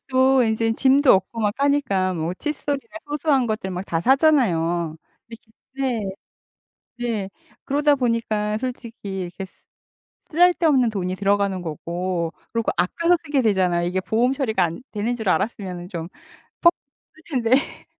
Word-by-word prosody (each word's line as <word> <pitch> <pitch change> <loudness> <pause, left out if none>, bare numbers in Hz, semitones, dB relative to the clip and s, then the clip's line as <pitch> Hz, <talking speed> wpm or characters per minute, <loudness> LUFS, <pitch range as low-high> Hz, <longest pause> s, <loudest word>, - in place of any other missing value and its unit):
또 260 0 +4
인제 225 0 +1
짐도 270 +3 +5
없고 190 +5 -1
막 210 -1 +1
하니까 265 -10 +1
뭐 165 +2 -2
칫솔이나 290 +1 -4
소소한 290 -4 +1
것들 215 -3 -3
막 180 +1 -4
다 165 -3 -1
사잖아요. 175 - +2 0.3
이렇게 230 0 -13 0.2
네. 255 -6 -1 1.0
네. 220 -5 -2 0.4
그러다 290 +1 +3
보니까 225 -4 0
솔직히 230 -6 -5
이렇게 180 +2 -7 0.8
쓰잘데없는 320 -7 +4
돈이 185 -3 -3
들어가는 200 -1 +1
거고 170 +1 -3 0.2
그리고 230 -1 0
아껴서 335 - +2
쓰게 285 -3 +1
되잖아요. 185 -5 +2
이게 185 +2 -1
보험 235 +7 +1
처리가 225 -9 0
안 170 +8 -4
되는 220 +3 -1
줄 220 -4 -3
알았으면 180 -3 -1
좀 170 -3 -5 0.5
퍽 340 0 +6 0.4
쓸텐데. 270 -3 -1
225 Hz, 295 characters per minute, -22 LUFS, 185-270 Hz, 1.0 s, 퍽